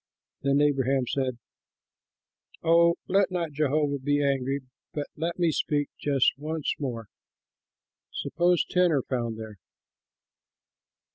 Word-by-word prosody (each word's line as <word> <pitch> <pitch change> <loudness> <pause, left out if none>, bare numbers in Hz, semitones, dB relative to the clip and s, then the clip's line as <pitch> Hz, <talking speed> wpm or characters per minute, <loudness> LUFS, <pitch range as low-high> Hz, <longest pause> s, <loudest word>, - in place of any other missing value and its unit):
Then 140 +1 +2
Abraham 135 -2 +2
said, 130 -1 -1 1.3
"Oh, 170 +1 +5
let 195 +1 +3
not 175 -4 -2
Jehovah 145 0 +1
be 145 +2 +1
angry, 135 0 0 0.3
but 145 -1 -2
let 165 +2 -3
me 170 -2 +2
speak 145 -1 0
just 140 -3 +2
once 155 0 -2
more. 120 -6 -4 1.1
Suppose 175 0 +1
ten 180 -1 +3
are 140 -5 +1
found 120 -3 -2
there?" 110 -3 -9
145 Hz, 115 wpm, -27 LUFS, 135-160 Hz, 1.3 s, Oh